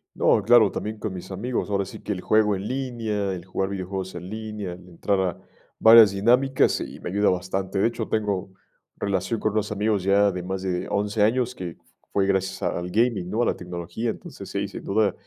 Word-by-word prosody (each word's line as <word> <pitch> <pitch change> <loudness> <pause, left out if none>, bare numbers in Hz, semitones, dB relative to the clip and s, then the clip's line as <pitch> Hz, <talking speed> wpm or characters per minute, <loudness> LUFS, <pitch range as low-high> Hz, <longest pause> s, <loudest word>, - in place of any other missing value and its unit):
No, - - +3
claro, 110 -1 +6
también 110 +1 -4
con 105 -2 -4
mis 90 +1 -8
amigos, 115 +4 -2
ahora 100 -1 0
sí - - -10
que - - -4
el 90 -3 -3
juego 110 0 +3
en 95 +2 -5
línea, 115 -7 -2
el 90 -1 -7
jugar 95 0 -2
videojuegos 95 -1 -4
en 90 +2 -7
línea, 105 -3 -5
entrar 90 +2 -2
a 95 -2 -1 0.4
varias 110 -2 +9
dinámicas, 125 +7 +3
y - - -7
me - - -5
ayuda 100 +2 +3
bastante, 95 +2 -2
de 110 - +4
hecho, 115 -1 -4
tengo 100 -4 -1 0.5
relación 100 +3 -1
con 110 - 0
unos 105 -1 -1
amigos 105 -1 +1
ya 100 +1 +4
de 90 - -4
más 95 +1 -4
de 90 -2 -2
11 105 +1 0
años, 125 +3 +2
que 90 -6 -7 0.3
fue 100 - +2
gracias 95 -1 -1
al 90 +1 -2
gaming, 105 -3 +1
¿no?, 115 +4 +1
a - - +2
la - - +1
tecnología, 90 +5 -4
entonces, 100 -3 -7
sí, 100 +1 -2
sin 100 - -9
duda, 105 0 +2
100 Hz, 205 wpm, -24 LUFS, 95-110 Hz, 0.5 s, varias